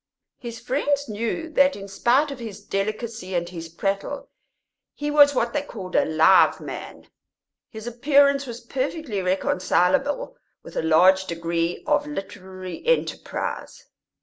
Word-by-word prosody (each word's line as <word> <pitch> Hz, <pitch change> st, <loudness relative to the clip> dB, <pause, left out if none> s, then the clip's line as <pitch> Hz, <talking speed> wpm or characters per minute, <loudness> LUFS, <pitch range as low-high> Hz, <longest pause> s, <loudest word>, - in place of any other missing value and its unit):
His 235 Hz, -2 st, -7 dB
friends 285 Hz, +3 st, -1 dB
knew 230 Hz, +9 st, -3 dB
that 280 Hz, -2 st, +3 dB
in 200 Hz, 0 st, -8 dB
spite 250 Hz, +9 st, +2 dB
of 275 Hz, -, -7 dB
his 215 Hz, -4 st, -7 dB
delicacy 215 Hz, -1 st, -3 dB
and 170 Hz, 0 st, 0 dB
his 165 Hz, -2 st, -8 dB
prattle 195 Hz, -, -3 dB, 0.6 s
he 295 Hz, 0 st, -3 dB
was 290 Hz, -1 st, +6 dB
what 235 Hz, -1 st, 0 dB
they 290 Hz, -, +1 dB
called 195 Hz, -10 st, -8 dB
a -, -, +4 dB
live 160 Hz, +4 st, +5 dB
man; -, -, -8 dB, 0.6 s
his 220 Hz, 0 st, -9 dB
appearance 280 Hz, +3 st, +3 dB
was 240 Hz, 0 st, -7 dB
perfectly 260 Hz, -, -3 dB
reconcilable 185 Hz, +8 st, +1 dB, 0.3 s
with -, -, -12 dB
a -, -, 0 dB
large 185 Hz, +4 st, +5 dB
degree 170 Hz, 0 st, -2 dB
of 295 Hz, -1 st, +1 dB
literary 190 Hz, -, -7 dB
enterprise. -, -, -2 dB
225 Hz, 135 wpm, -24 LUFS, 185-280 Hz, 0.6 s, was